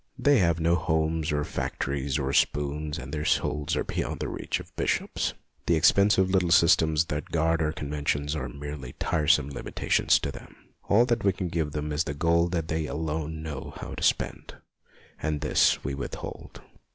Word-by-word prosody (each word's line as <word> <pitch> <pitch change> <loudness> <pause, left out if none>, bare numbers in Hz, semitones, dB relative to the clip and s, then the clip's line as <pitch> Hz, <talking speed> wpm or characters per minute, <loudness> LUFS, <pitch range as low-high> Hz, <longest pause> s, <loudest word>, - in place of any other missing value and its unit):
They 145 -3 +4
have 85 -3 +2
no 85 +1 +2
homes 80 -1 0
or 75 0 0
factories, 70 0 -2
or 70 -2 -2
spoons, 75 +1 0
and - - -8
their 75 -1 -2
souls 75 0 0
are - - 0
beyond - - -3
the - - -3
reach - - -3
of - - -13
Bishops. - - -1 0.3
The 85 - +4
ex 80 - +6
pensive 100 -2 +3
little 90 -2 +2
systems 80 -2 +4
that 75 -1 -3
guard 80 0 +1
our 75 -1 +1
con 75 -3 -6
ventions 75 0 -1
are 75 - -3
merely 75 -2 -7
tiresome 75 -2 +2
limitations 70 - +1
to - - -2
them. - - -12 0.3
All 115 +4 +5
that 120 -2 0
we 100 - +4
can 90 -1 -4
give 80 -3 -2
them 75 0 -3
is 75 +2 0
the 70 - -4
gold 85 +3 +2
that 85 -2 -1
they 80 -1 -1
alone 80 0 -3
know 75 -4 -6
how - - -7
to - - -7
spend, - - 0 0.7
and 75 -2 -1
this - - +3
we 70 - -3
withhold. 70 0 -7
80 Hz, 190 wpm, -27 LUFS, 75-85 Hz, 0.7 s, ex